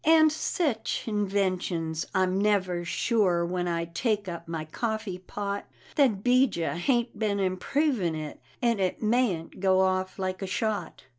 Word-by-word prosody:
And 315 0 +6
sech 310 - -1
inventions! 185 -6 -1
I'm 190 +1 +2
never 190 -4 +1
sure 180 -1 +1
when 180 0 -2
I 170 -1 -1
take 205 +4 -1
up 170 -2 -6
my 165 -1 -4
coffee 215 +2 -3
pot, 200 +2 -4 0.3
That 240 -10 +3
'Bijah 245 -11 +3
hain't 235 +2 0
been 205 -2 0
"improvin'" 190 - 0
it, 155 -1 -6 0.2
and 235 -3 +2
it 185 +3 -1
mayn't 215 -7 +1
go 190 0 +4
off 185 0 0
like 185 0 -3
a 195 - -3
shot. 205 -2 -2
195 Hz, 145 wpm, -28 LUFS, 180-220 Hz, 0.3 s, And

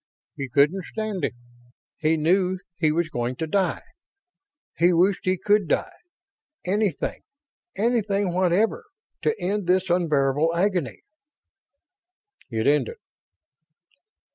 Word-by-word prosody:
He 135 -3 -5
couldn't 150 +9 +3
stand 215 -4 -4
it - - -1 0.6
he 160 +1 +2
knew 180 +4 +2 0.2
he 160 -2 +2
was 170 +1 0
going 120 -2 -2
to 160 - -3
die 190 +3 0 0.9
he 175 +2 +4
wished 185 +3 +2
he 185 0 +2
could 205 0 +2
die - - 0 0.7
anything, 195 -3 -1 0.5
anything 205 -4 0
whatever, 190 - +1 0.4
to 450 0 0
end 200 0 -2
this 185 0 +2
unbearable 155 -2 +2
agony.... 170 - -1 1.5
It 110 -2 -2
ended. 145 -4 +2
180 Hz, 110 wpm, -24 LUFS, 155-195 Hz, 1.5 s, he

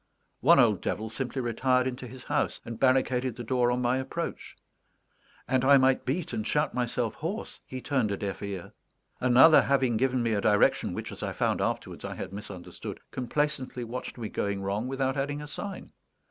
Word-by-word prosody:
One - - +6
old - - +4
devil 110 +2 -3
simply 130 +1 -3
retired 125 +2 +2
into 125 0 -4
his 125 +1 -11
house, - - -1
and 115 -1 -6
barricaded 130 -2 +2
the 120 - -6
door 125 +1 +2
on 125 0 0
my 125 +2 +2
approach; 130 - -5 0.9
and 130 -1 +2
I 140 +1 +7
might 130 0 +3
beat 155 +6 -2
and 110 0 -2
shout 150 -1 +1
myself 120 -2 -1
hoarse, 185 +9 -5
he 130 0 -6
turned 130 -6 0
a 100 - -2
deaf 100 -2 -4
ear. 100 -3 -6 0.5
Another, 130 +5 +7
having 130 -4 +2
given 130 0 +1
me 115 -1 +1
a 100 - +1
direction 105 -1 +3
which, - - -5
as - - -9
I - - -3
found - - 0
afterwards, - - -3
I - - -5
had - - -6
misunderstood, 100 -3 -8
complacently 130 0 -2
watched 120 +3 -6
me 115 -3 -4
going 100 -1 -2
wrong 100 +5 -1
without 135 0 -1
adding 145 +1 -1
a 150 - -6
sign. 195 +7 -6
125 Hz, 190 wpm, -28 LUFS, 115-135 Hz, 0.9 s, I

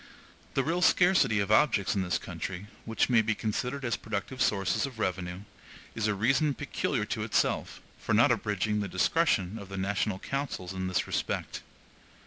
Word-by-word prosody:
The 135 - +2
real 170 +5 0
scarcity 175 - +4
of 100 +1 -1
objects 110 -5 +3
in 100 - 0
this 90 -1 0
country, 95 +1 -6 0.2
which 115 - +1
may 120 -3 +5
be 110 0 0
considered 125 +6 -2
as 115 -4 0
productive 115 +4 -4
sources 95 +4 +1
of 130 -4 -11
revenue, 90 -3 -2 0.5
is 110 -2 -1
a 105 - +1
reason 135 +7 +2
peculiar - - -2
to - - -3
itself, - - 0 0.2
for - - 0
not - - +5
abridging 105 +1 0
the 100 - -2
discretion 100 - +1
of 100 - -10
the 95 - -6
national 100 +1 -1
councils 125 -7 -4
in 95 0 -3
this 90 - 0
respect. - - -3
105 Hz, 170 wpm, -29 LUFS, 95-130 Hz, 0.5 s, may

